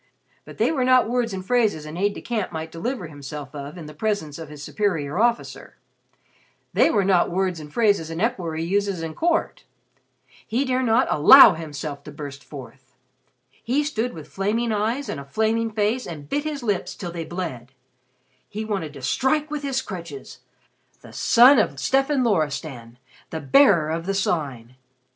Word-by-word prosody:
But -, -, -12 dB
they -, -, +2 dB
were 275 Hz, -5 st, 0 dB
not 255 Hz, -1 st, +4 dB
words 240 Hz, -1 st, 0 dB
and 190 Hz, -1 st, -6 dB
phrases 215 Hz, -9 st, +1 dB
an 155 Hz, +1 st, -8 dB
aide 200 Hz, +3 st, 0 dB
de -, -, -7 dB
camp 225 Hz, -6 st, -3 dB
might 160 Hz, -1 st, -6 dB
deliver 215 Hz, +4 st, -4 dB
himself 145 Hz, -2 st, -8 dB
of 145 Hz, +3 st, -7 dB
in 165 Hz, -, -8 dB
the 150 Hz, -, -10 dB
presence 165 Hz, -5 st, -2 dB
of 160 Hz, -2 st, -8 dB
his 150 Hz, -1 st, -10 dB
superior 170 Hz, -5 st, -1 dB
officer; 235 Hz, +1 st, -1 dB, 1.0 s
they -, -, +4 dB
were 205 Hz, -, +2 dB
not 185 Hz, -3 st, +3 dB
words 185 Hz, -1 st, -1 dB
and 150 Hz, -1 st, -10 dB
phrases 200 Hz, -7 st, +2 dB
an 165 Hz, 0 st, -5 dB
equerry 175 Hz, -8 st, -1 dB
uses 195 Hz, -1 st, -1 dB
at 160 Hz, -1 st, -5 dB
court. 335 Hz, 0 st, 0 dB, 0.8 s
He 245 Hz, +6 st, 0 dB
dare 255 Hz, 0 st, 0 dB
not 240 Hz, 0 st, +3 dB
allow 215 Hz, -, +9 dB
himself 150 Hz, -3 st, -6 dB
to 150 Hz, -, -8 dB
burst 145 Hz, -1 st, -8 dB
forth. 130 Hz, -1 st, -12 dB, 0.6 s
He 270 Hz, +6 st, -1 dB
stood 250 Hz, -5 st, -2 dB
with 155 Hz, -3 st, -10 dB
flaming 220 Hz, +6 st, -1 dB
eyes 225 Hz, +7 st, -1 dB
and 140 Hz, -, -4 dB
a -, -, -7 dB
flaming 220 Hz, +9 st, 0 dB
face, 215 Hz, +4 st, 0 dB
and 150 Hz, -4 st, -8 dB
bit 290 Hz, -, -2 dB
his 295 Hz, -4 st, -4 dB
lips 205 Hz, -5 st, -2 dB
till 175 Hz, -3 st, -6 dB
they 170 Hz, -1 st, -5 dB
bled. 160 Hz, -9 st, -6 dB, 0.8 s
He 215 Hz, +1 st, -5 dB
wanted 195 Hz, -9 st, -3 dB
to 140 Hz, -3 st, -11 dB
strike 295 Hz, -, 0 dB
with 300 Hz, -1 st, -3 dB
his 270 Hz, -2 st, -2 dB
crutches. 170 Hz, -, -8 dB, 0.6 s
The -, -, -14 dB
son 250 Hz, +2 st, +6 dB
of 140 Hz, -10 st, 0 dB
Stefan 270 Hz, -, +1 dB
Loristan! 145 Hz, -, -2 dB, 0.3 s
The 160 Hz, -, -4 dB
Bearer 160 Hz, -, +4 dB
of 165 Hz, +2 st, -3 dB
the 195 Hz, -, 0 dB
Sign! 135 Hz, -10 st, -2 dB
185 Hz, 175 wpm, -23 LUFS, 150-235 Hz, 1.0 s, allow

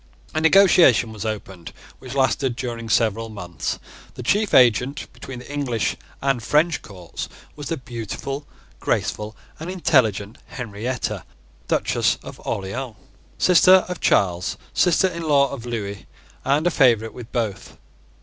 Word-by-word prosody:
A 155 Hz, -, 0 dB
negotiation 160 Hz, -, +6 dB
was 110 Hz, 0 st, -6 dB
opened 95 Hz, -5 st, -5 dB, 0.3 s
which 130 Hz, 0 st, -8 dB
lasted 130 Hz, -1 st, +1 dB
during 115 Hz, -3 st, -5 dB
several 115 Hz, 0 st, +1 dB
months. 90 Hz, -7 st, -4 dB, 0.4 s
The 125 Hz, -, -7 dB
chief 205 Hz, -, +1 dB
agent 125 Hz, +3 st, +4 dB
between 135 Hz, -, -9 dB
the 125 Hz, +3 st, -9 dB
English 130 Hz, -6 st, -1 dB, 0.3 s
and 135 Hz, -3 st, +1 dB
French 155 Hz, +6 st, +2 dB
courts 90 Hz, -4 st, -8 dB, 0.3 s
was 145 Hz, -1 st, -7 dB
the 165 Hz, -, -2 dB
beautiful, 130 Hz, +3 st, -6 dB, 0.3 s
graceful, 105 Hz, +1 st, -2 dB, 0.2 s
and 160 Hz, +3 st, -6 dB
intelligent 115 Hz, -, +1 dB
Henrietta, 120 Hz, +1 st, -4 dB, 0.4 s
Duchess -, -, +1 dB
of -, -, -10 dB
Orleans, 110 Hz, +5 st, -4 dB, 0.4 s
sister 185 Hz, +1 st, +6 dB
of 180 Hz, 0 st, -6 dB
Charles, 90 Hz, -2 st, +2 dB, 0.2 s
sister 180 Hz, +1 st, +3 dB
in 170 Hz, -2 st, -5 dB
law 140 Hz, -4 st, +3 dB
of 125 Hz, -3 st, -7 dB
Lewis, 100 Hz, -4 st, -4 dB, 0.4 s
and 145 Hz, +4 st, +2 dB
a 175 Hz, -, +3 dB
favourite 115 Hz, -7 st, +3 dB
with 120 Hz, -2 st, -10 dB
both. 110 Hz, -6 st, -3 dB
125 Hz, 135 wpm, -22 LUFS, 110-145 Hz, 0.4 s, negotiation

